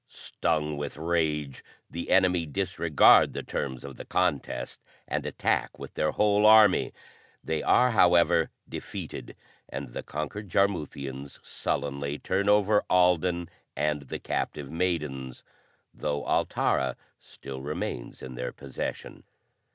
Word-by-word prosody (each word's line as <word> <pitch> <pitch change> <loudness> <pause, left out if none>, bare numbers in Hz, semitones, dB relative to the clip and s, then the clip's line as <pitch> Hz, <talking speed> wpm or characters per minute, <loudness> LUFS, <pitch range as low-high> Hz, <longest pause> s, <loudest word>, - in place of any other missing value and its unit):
Stung 75 -2 -2
with 70 0 -5
rage, 75 -4 -1 0.2
the 85 +1 -6
enemy 90 -3 +3
disregard 70 - +4
the - - -4
terms 65 -2 -4
of 70 -2 -9
the - - -7
contest 70 -8 -1 0.3
and - - -2
attack - - -1
with - - -9
their 75 - 0
whole 105 0 +4
army. 110 -3 +6 0.5
They 80 -1 -1
are, 125 0 +4
however, 90 -5 +4 0.2
defeated, - - -7 0.3
and 70 -2 -6
the - - -4
conquered 85 +7 -5
Jarmuthians 70 -8 -2
sullenly 70 +1 -3
turn 100 +5 0
over 105 0 +4
Alden 90 -1 +3 0.3
and 75 -1 0
the 65 - -6
captive 70 -2 -3
maidens; 75 -7 -2 0.5
though 75 -1 -3
Altara 65 -1 +1 0.2
still 65 -1 -9
remains 70 -4 -5
in 65 - -7
their 60 0 -4
possession. 70 -2 -6
75 Hz, 120 wpm, -27 LUFS, 70-90 Hz, 0.5 s, army